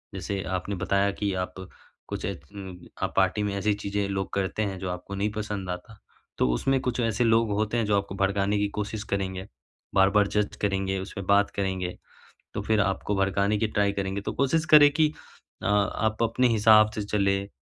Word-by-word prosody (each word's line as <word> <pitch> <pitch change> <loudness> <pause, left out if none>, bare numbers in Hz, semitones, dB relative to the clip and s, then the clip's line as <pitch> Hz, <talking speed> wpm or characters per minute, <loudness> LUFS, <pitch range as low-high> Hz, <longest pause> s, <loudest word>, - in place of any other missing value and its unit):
जैसे 100 -1 -3 0.2
आपने 100 +3 -4
बताया 100 +2 +1
कि 100 0 -2
आप 90 0 -3 0.5
कुछ - - -4
इतन 95 +6 -7 0.3
आप - - -1
पार्टी 105 - +2
में 100 -1 -1
ऐसी 105 +2 +1
चीज़ें 100 0 -2
लोग 95 -1 -3
करते 100 +2 -1
हैं 100 -2 -3
जो 95 -1 -4
आपको 90 +2 -6
नहीं 100 +2 0
पसंद 105 -3 -4
आता 90 +5 -7 0.4
तो - - +2
उसमें 135 - +1
कुछ 125 -1 -2
ऐसे 115 0 +1
लोग 115 -1 +3
होते 105 +3 0
हैं 115 - +1
जो 105 -1 +2
आपको 100 -1 -3
भड़काने 100 +1 +1
की 100 0 +1
कोशिश 105 0 -3
करेंगे 95 -1 -3 0.5
बार-बार 100 +1 +4
जज 105 0 -1
करेंगे, 95 -1 0
उसमें 100 0 -6
बात 100 0 +4
करेंगे 95 -2 -2 0.6
तो - - -3
फिर 110 -1 +2
आपको 100 +1 -1
भड़काने 100 +2 +1
की 110 - +1
ट्राई 100 -1 +1
करेंगे 100 0 -2
तो - - -4
कोशिश 150 +4 +1
करें 145 -1 +9
कि 155 0 +3 0.5
अ, - - 0
आप 105 +2 +1
अपने 115 +3 +2
हिसाब 110 -1 +6
से 105 - -2
चलें 100 -1 0
100 Hz, 190 wpm, -26 LUFS, 95-105 Hz, 0.6 s, करें